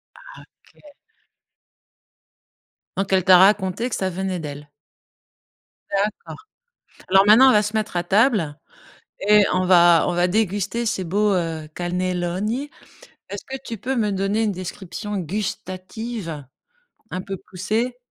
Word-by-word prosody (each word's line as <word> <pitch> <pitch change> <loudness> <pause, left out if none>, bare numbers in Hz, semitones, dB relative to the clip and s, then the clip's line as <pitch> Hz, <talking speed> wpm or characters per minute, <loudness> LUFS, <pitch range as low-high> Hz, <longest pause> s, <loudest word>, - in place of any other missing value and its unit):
Ah - - -16 0.4
OK. 295 -1 -21 2.0
Donc 195 0 -2
elle 185 -2 +3
t'a 185 -1 +7
raconté 195 +4 +3
que - - -3
ça 190 -1 -1
venait 185 0 -3
d'elle. 145 -1 -8 1.2
D'accord. 210 - -3 0.6
Alors 195 +1 +5
maintenant 235 +6 +7
on - - +6
va 210 - +4
se 210 +1 -4
mettre 215 -4 -2
à 175 - 0
table 195 - +2 0.7
et 210 0 +6
on 185 0 +1
va 175 -2 +6
on - - 0
va 175 +1 +2
déguster 205 +3 -1
ces 215 -4 -1
beaux, 205 +4 +1
heu, 165 -3 -3
cannelloni. 180 +8 -2 0.6
Est-ce - - -7
que 265 - -6
tu 230 - -6
peux 260 +5 -3
me 210 -3 +1
donner 195 +3 0
une 210 - 0
description 190 +3 -6
gustative 185 - -5 0.7
un 185 - -3
peu 195 0 -6
poussée? 220 +9 -3
195 Hz, 135 wpm, -22 LUFS, 180-215 Hz, 2.0 s, t'a